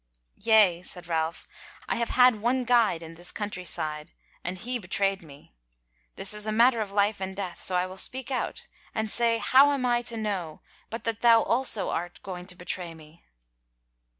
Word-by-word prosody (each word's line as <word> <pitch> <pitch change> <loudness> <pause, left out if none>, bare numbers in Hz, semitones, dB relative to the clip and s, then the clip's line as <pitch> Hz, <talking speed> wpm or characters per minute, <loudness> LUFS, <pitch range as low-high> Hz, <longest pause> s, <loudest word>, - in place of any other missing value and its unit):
"Yea," 210 -6 +4
said 180 -1 -4
Ralph, 165 0 -2 0.4
"I - - -1
have 235 0 -1
had 250 -4 +5
one 250 +3 +1
guide 230 -9 +3
in 165 0 -9
this 175 +2 -6
country 205 -4 -5
side 150 -3 -2 0.3
and 180 +1 -4
he 245 +6 -3
bewrayed 195 0 -1
me. 145 - -16 0.6
This - - -2
is 210 0 -5
a - - 0
matter 235 +1 +4
of 210 - -3
life 205 0 +1
and 190 0 -4
death, 190 -3 -5
so 185 - 0
I 180 0 +2
will 185 +1 -9
speak 260 +6 0
out 255 - -3 0.3
and 220 -1 -2
say 235 -1 +2
how 270 +4 +5
am 275 -3 -1
I 240 -1 +2
to 230 - -5
know 195 -8 -4 0.3
but 230 - -6
that 230 -1 -3
thou 230 -1 +6
also 235 -5 +2
art 175 +1 -4
going 180 -2 -7
about - - -11
to 180 - -2
bewray 175 -1 -5
me?" 155 +1 -17
200 Hz, 195 wpm, -27 LUFS, 175-235 Hz, 0.6 s, thou